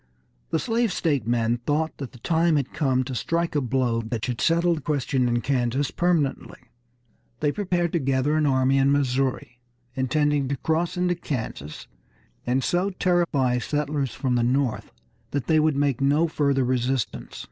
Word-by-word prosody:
The - - +1
slave 230 +3 0
state 145 - 0
men 120 0 +1
thought 150 +6 -2
that 135 -3 -6
the - - -14
time 165 +5 +2
had 140 -3 -1
come 135 -4 +1
to 130 +1 -6
strike 165 +7 -1
a 145 - +1
blow 125 -2 0
that 115 0 -4
should 125 -2 -3
settle 170 +1 +3
the 160 - -4
question 135 -3 0
in 120 0 0
Kansas 130 +1 0
permanently. 170 -6 0 0.8
They 150 -1 +1
prepared 175 -3 -1
to 170 - +2
gather 135 +1 +1
an 155 -1 +2
army 135 0 +3
in 135 +1 +3
Missouri, 130 -3 0 0.3
intending 140 +2 +1
to 140 +1 -2
cross 160 +6 -1
into 180 0 +1
Kansas, 110 - -5 0.6
and 130 +2 +1
so 180 +7 +1
terrify 170 -10 +1
settlers 145 -1 -2
from 130 -3 -1
the 120 - +2
North 125 -1 0 0.4
that 140 -4 -2
they 155 +2 +3
would 155 -1 +2
make 140 -2 0
no 145 +4 +3
further 140 -4 +1
resistance. 125 -2 -2
140 Hz, 170 wpm, -24 LUFS, 125-160 Hz, 0.8 s, settle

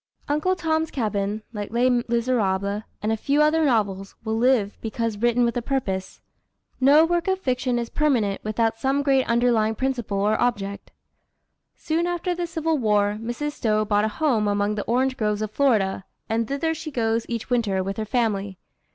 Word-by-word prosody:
Uncle 305 +6 +1
Tom's 320 -2 0
Cabin, 210 -3 -2
like 205 -2 -5
Les 240 +3 +2
Miseràbles, 230 -5 0 0.2
and 215 - +1
a - - +2
few 280 +6 0
other 305 +2 +4
novels, 200 -7 0
will 220 -1 -1
live, 225 -3 +2
because 225 -1 -3
written 240 +1 +3
with 235 - -1
a 245 - 0
purpose. 205 -8 -3 0.6
No 285 +4 +6
work 345 +1 0
of 380 0 +2
fiction 255 -6 -1
is 235 -1 -3
permanent 235 -10 +1
without 225 +1 0
some 270 +3 +1
great 270 -2 +2
underlying 235 -2 +2
principle 240 -5 -2
or 210 +2 +1
object. 200 -5 -2 0.8
Soon 330 +2 -1
after 350 +1 -1
the 350 0 -3
Civil 325 -2 -1
War, 210 -2 +1
Mrs. 240 +6 -3
Stowe 215 -6 0
bought 205 0 +2
a - - +2
home 225 -3 +1
among 205 0 +1
the 210 - -4
orange 260 +3 +1
groves 210 -2 0
of 215 - -4
Florida, 215 -8 +1 0.2
and 225 0 0
thither 280 +5 -1
she 315 0 -6
goes 230 -4 -1
each 235 +1 -4
winter, 205 -6 +1
with 195 +2 -4
her 220 - -1
family. 205 -4 -1
235 Hz, 175 wpm, -24 LUFS, 210-275 Hz, 0.8 s, No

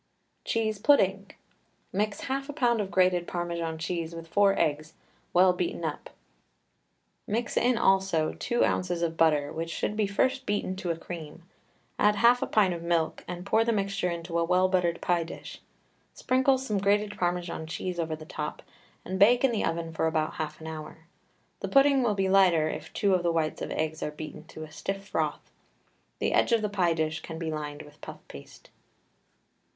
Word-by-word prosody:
CHEESE 220 -2 0
PUDDING. 195 -6 +3 0.6
Mix 210 +2 -1
half 275 +2 -3
a - - -4
pound 240 -6 +2
of 195 - -4
grated 180 -2 +2
Parmesan 170 -2 -3
cheese 165 0 -3
with 165 0 -8
four 200 +3 +3
eggs, 155 +1 0 0.4
well 180 +1 +5
beaten 175 -1 -3
up; 150 -2 -4 1.2
mix 225 +2 -2
in 245 0 +3
also 190 -7 +2
two 240 -1 +1
ounces 175 -2 -1
of 165 -1 -1
butter, 150 -3 +2
which 165 +1 -4
should 210 - -2
be 215 -1 +1
first 260 +6 0
beaten 205 -2 -1
to 185 -2 -4
a 165 - -1
cream, 165 -1 -8 0.6
add 210 0 +4
half 235 +3 +5
a - - -1
pint 200 -4 +3
of 170 - -6
milk 170 -2 0
and 180 +1 -6
pour 220 +3 +3
the 230 - +1
mixture 195 -3 -1
into 170 0 -3
a - - +2
well 180 +2 +3
buttered 180 -2 +1
pie 175 -1 +1
dish, 165 - -9 0.5
sprinkle 260 +1 +2
some 220 -6 -2
grated 205 +1 +1
Parmesan 175 -3 -2
cheese 175 +2 -4
over 160 -1 -1
the 155 0 -11
top, 150 -1 -5 0.4
and 190 +1 -3
bake 240 +6 +6
in 265 - +4
the 225 - -1
oven 165 0 -2
for 160 - 0
about 155 -1 0
half 155 -1 -5
an 160 - -10
hour. 160 0 -8 0.5
The - - -3
pudding 275 0 +5
will 225 -4 +1
be 195 -1 +1
lighter 185 -5 +4
if - - -6
two 200 -2 +1
of 180 - +3
the 170 -1 +1
whites 160 -2 -1
of - - -3
eggs 160 0 -2
are - - -1
beaten 155 +1 -9
to 155 -1 -9
a 155 - -10
stiff 195 +4 -5
froth. - - -2 0.7
The - - 0
edge - - +3
of 225 -2 +3
the 210 - 0
pie 180 -5 +1
dish 160 0 -1
can 160 - -8
be 160 -1 -3
lined 150 -1 -5
with 150 - -17
puff - - -10
paste. 70 - -13
180 Hz, 190 wpm, -28 LUFS, 160-205 Hz, 1.2 s, bake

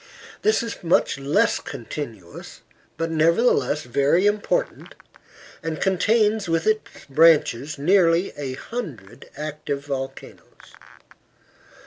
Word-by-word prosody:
This 435 - +2
is 230 -4 -7
much 165 -4 +2
less 140 +2 +2
continuous, 115 - -8 0.4
but 165 0 -2
nevertheless 160 - +2
very 140 - +2
important, 210 - -1 0.7
and 160 -1 -4
contains, 210 +1 +1
with 165 0 0
its 215 0 -2
branches, 150 -2 +3
nearly 170 +3 +3
a 135 -3 -5
hundred 160 - -8
active 150 -2 -5
volcanoes. 135 -1 -8
160 Hz, 95 wpm, -23 LUFS, 140-195 Hz, 0.7 s, branches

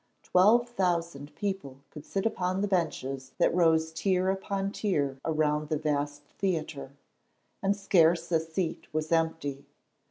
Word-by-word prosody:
Twelve 220 +7 +4
thousand 170 -9 -2
people 190 -10 -4
could 150 -1 -11
sit 195 +1 -2
upon 185 -3 0
the 205 - +1
benches 135 -8 -2
that - - +3
rose 160 -2 +3
tier 185 +2 +1
upon 195 0 -2
tier 145 -11 -1
around 150 -1 0
the 155 - +1
vast 145 -1 -2 0.2
theatre, 160 -7 -2 0.7
and 195 0 +1
scarce 175 -4 +3
a 165 - +4
seat 160 +1 -4
was 155 +1 -1
empty. 160 -4 0
165 Hz, 135 wpm, -29 LUFS, 150-190 Hz, 0.7 s, Twelve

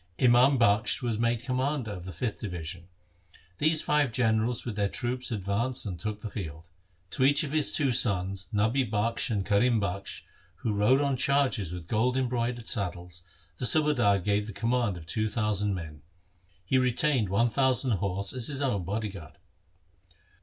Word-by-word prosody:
Imam 125 +2 +5
Bakhsh 110 +2 +2
was 115 -3 -1
made 115 0 0
commander 130 -1 -2
of 90 -3 -7
the 95 - -6
fifth 105 +5 -4
division. 90 -3 -6 0.7
These 155 +1 +2
five 150 -4 +2
generals 115 0 +1
with 115 -4 -4
their 100 -1 0
troops 125 +3 -2
advanced 115 +4 -2
and 90 -5 -5
took 105 +2 -5
the 110 - -5
field. 80 -3 -7 0.4
To - - -1
each 145 +3 +4
of 145 - -4
his 155 -1 +3
two 140 -4 +2
sons, 95 -4 +2
Nabi 110 +5 +1
Bakhsh 115 +2 -1
and 100 -4 -1
Karim 110 +3 +2
Bakhsh, 100 0 -4 0.3
who 110 - -3
rode 105 +7 +3
on 140 -2 0
chargers 130 - +1
with 90 -2 -7
gold 125 +6 +1
embroidered 120 -2 -2
saddles, 90 -5 -3 0.4
the 125 - +2
subadar 140 -10 +3
gave 105 +2 -1
the 105 - -7
command 115 -3 0
of 80 - -11
two 110 +6 -1
thousand 105 -2 -1
men. 80 -4 -8 0.6
He 130 +8 +2
retained 125 -3 +1
one 115 +5 +2
thousand 130 0 +2
horse 100 +1 -3
as 125 -3 0
his 145 -1 -1
own 105 -9 0
body 105 +4 -3
guard. 85 -7 -11
110 Hz, 170 wpm, -28 LUFS, 100-125 Hz, 0.7 s, Imam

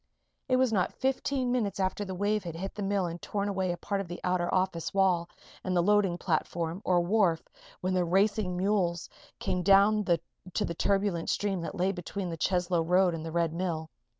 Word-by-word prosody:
It 255 - +4
was 255 -2 +2
not 185 -4 +1
fifteen 265 -1 0
minutes 210 -6 -1
after 190 +2 0
the 190 -2 -5
wave 205 +2 0
had 170 -2 -6
hit 190 +3 -5
the 210 - -6
mill 195 -1 0
and 170 0 -5
torn 200 -1 -2
away 190 -2 0
a 175 - -4
part 200 +3 -2
of 195 - -7
the 175 - -6
outer 180 -1 0
office 185 -2 -1
wall 180 -3 +2 0.3
and 185 -1 0
the 175 - +3
loading 200 -2 +3
platform, 170 +1 -2
or 180 -1 +3
wharf, 175 -3 +2 0.3
when 185 +1 0
the 180 -1 +2
racing 190 +1 +1
mules 180 -3 0 0.3
came 180 - -1
down 200 +3 +5
to 180 +3 -2
the 170 - -3
turbulent 195 -1 0
stream 195 -3 0
that 165 - -5
lay 185 0 +1
between 185 +1 -5
the - - -3
Cheslow 180 0 +1
road 180 +2 +3
and 160 -1 -5
the 165 - -5
Red 170 -1 0
Mill. 165 -3 -3
185 Hz, 205 wpm, -29 LUFS, 175-200 Hz, 0.3 s, down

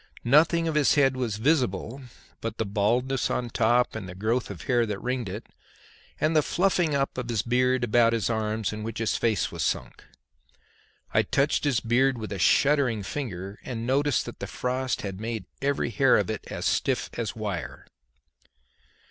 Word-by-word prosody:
Nothing 160 +6 +4
of 160 - 0
his 150 -1 +3
head 135 -3 +4
was 120 -5 -2
visible 125 - 0 0.4
but 115 -1 -4
the 110 - -1
baldness 120 +6 0
on 125 - 0
the 120 - -6
top 120 +2 +2
and 100 -4 -6
the 90 - -8
growth 110 +5 -1
of 100 -5 -8
hair 120 -2 +2
that 105 -2 -3
ringed 125 -4 -2
it, 105 +5 -6 0.7
and 155 +1 +1
the 155 - +6
fluffing 175 -2 +1
up 135 -2 -1
of 120 -1 -5
his 115 -4 0
beard 125 +1 +2
about 120 0 +4
his 115 -2 0
arms 110 -2 -1
in 105 - -6
which 115 +1 -5
his 110 -1 0
face 110 -5 0
was - - -5
sunk. - - -2 1.1
I - - +5
touched 140 +2 +1
his 130 -6 +2
beard 125 +3 +2
with 110 -2 -6
a 100 - -4
shuddering 135 - +3
finger, 100 -5 -5
and 115 -2 -5
noted 140 +1 +1
that - - -9
the - - -5
frost 130 +1 -2
had 100 -1 -5
made 110 -3 -4 0.2
every 140 -3 0
hair 100 - +4
of - - 0
it - - -5
as - - -5
stiff - - 0
as - - -3
wire. - - -5
120 Hz, 185 wpm, -26 LUFS, 110-135 Hz, 1.1 s, the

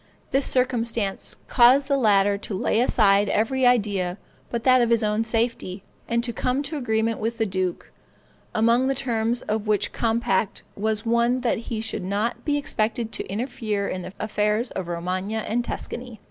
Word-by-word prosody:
This 270 +1 +2
circumstance 235 -5 0
caused 260 +3 +5
the 280 - +2
latter 205 -5 +3
to 200 0 -4
lay 200 - +1
aside 205 -4 +3
every 250 +4 +2
idea 200 -6 +1 0.3
but 235 -1 -3
that 255 -1 +5
of 235 - +2
his 230 -1 +3
own 210 +1 +1
safety, 225 -4 -2 0.2
and 235 0 0
to 235 -1 -2
come 255 +4 -1
to 300 +3 -3
agreement 225 -4 0
with 225 +2 -2
the 225 - +1
duke; 185 -3 -3 0.6
among 235 +4 +3
the 270 - +1
terms 235 -2 -1
of 215 0 -2
which 210 -1 +1
compact 225 -4 0
was 215 +1 -1
one 235 +2 +2
that 240 -2 0
he 220 -2 -2
should 225 - -3
not 205 +5 -2
be 290 -1 +1
expected 230 -4 -1
to - - -4
interfere 215 -2 -2
in 185 - -3
the 185 - -8
affairs 215 +2 0
of 185 -2 -4
Romagna 185 +5 -3
and 240 +3 0
Tuscany. 240 -2 -6
225 Hz, 175 wpm, -24 LUFS, 205-245 Hz, 0.6 s, caused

